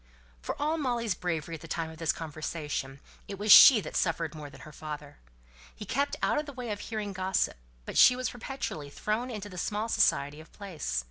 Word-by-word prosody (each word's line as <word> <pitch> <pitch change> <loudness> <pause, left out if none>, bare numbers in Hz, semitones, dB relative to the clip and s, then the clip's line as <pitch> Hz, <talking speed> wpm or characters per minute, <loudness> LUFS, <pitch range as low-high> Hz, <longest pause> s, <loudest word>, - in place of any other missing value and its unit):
For - - -5
all 310 +3 0
Molly's 240 -6 0
bravery 170 -3 -3
at 160 - -7
the 165 - -10
time 165 0 -3
of 160 - -13
this 165 -3 +1
conversation, 150 -3 -5 0.3
it 200 - -6
was 210 +1 +1
she 250 +1 +11
that - - -8
suffered 165 -2 0
more 150 -2 -8
than - - -14
her 155 - -11
father. 150 -1 -8 0.6
He - - -8
kept 280 +3 -1
out - - +2
of 300 - -5
the 285 - -7
way 250 -4 -5
of 205 - -4
hearing 210 -3 -4
gossip; 190 0 0 0.3
but - - -1
she 250 - +8
was 255 0 -2
perpetually 245 - -5
thrown 215 - -2
into 210 -4 -6
the 180 -3 -8
small 210 +5 -2
society 145 -7 +2
of 160 - -17
the - - -23
place. 160 - -3
185 Hz, 215 wpm, -29 LUFS, 155-230 Hz, 0.6 s, she